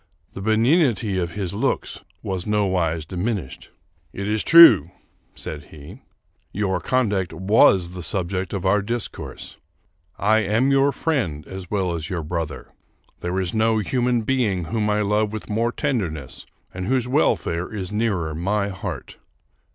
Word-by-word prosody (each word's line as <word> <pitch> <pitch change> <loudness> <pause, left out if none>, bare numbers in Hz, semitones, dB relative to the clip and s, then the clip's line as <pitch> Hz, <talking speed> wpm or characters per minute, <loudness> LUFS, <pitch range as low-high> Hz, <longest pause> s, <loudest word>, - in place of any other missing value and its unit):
The 95 - -7
benignity 110 - +2
of 85 0 -3
his 95 -4 -3
looks 100 - -2 0.2
was 95 -1 -3
nowise 95 -7 0
diminished. 90 - -4 0.2
" 85 -3 -40
It 100 - -3
is 105 0 0
true," 125 - +8 0.5
said 75 -2 -6
he, 75 -2 -13 0.2
" - - -44
your 95 -3 0
conduct 105 -5 0
was 95 -2 +4
the 90 0 -7
subject 90 +1 -2
of 100 -2 -4
our 100 +2 +3
discourse. 115 +2 -5 0.6
I 110 +2 +3
am 110 +6 +1
your 135 +1 +4
friend 110 - -2
as 95 -2 -8
well 95 -4 -1
as 80 -1 -4
your 85 -3 -3
brother. 80 -1 -5 0.5
There 90 +2 -2
is 90 -2 -2
no 110 0 +2
human 120 +1 0
being 110 -8 0
whom 105 +6 -1
I 105 0 +1
love 105 +1 +1
with 110 0 -6
more 115 +3 +1
tender 125 - -1
ness 75 -4 -9 0.3
and 95 0 -5
whose 125 -1 +1
welfare 90 - 0
is 100 -3 -4
nearer 100 -8 -1
my 100 +5 -1
heart. 95 -2 -7
100 Hz, 155 wpm, -22 LUFS, 90-110 Hz, 0.6 s, true